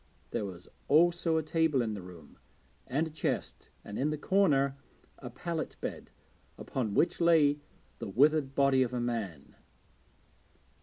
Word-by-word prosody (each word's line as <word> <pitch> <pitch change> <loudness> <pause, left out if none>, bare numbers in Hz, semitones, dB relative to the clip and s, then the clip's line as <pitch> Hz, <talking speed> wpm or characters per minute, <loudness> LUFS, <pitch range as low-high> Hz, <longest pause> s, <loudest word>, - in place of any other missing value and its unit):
There 105 - -2
was 90 -2 -9 0.2
also 170 +1 +4
a 160 - 0
table 160 -2 +1
in 110 -2 -2
the 100 - -6
room, 85 -7 -13 0.5
and 145 +6 0
a - - -6
chest, 155 - -3 0.2
and, 100 - -6
in 145 - +1
the 155 - -2
corner, 145 -6 +2 0.4
a 125 - -7
pallet 165 +6 -4
bed, - - -6 0.5
upon 110 -6 -3
which 170 +1 +2
lay 155 -4 +4 0.4
the - - -5
withered 140 +4 +3
body 140 -1 +4
of 125 -1 0
a - - -1
man. 110 -11 -4
140 Hz, 150 wpm, -31 LUFS, 115-160 Hz, 0.5 s, also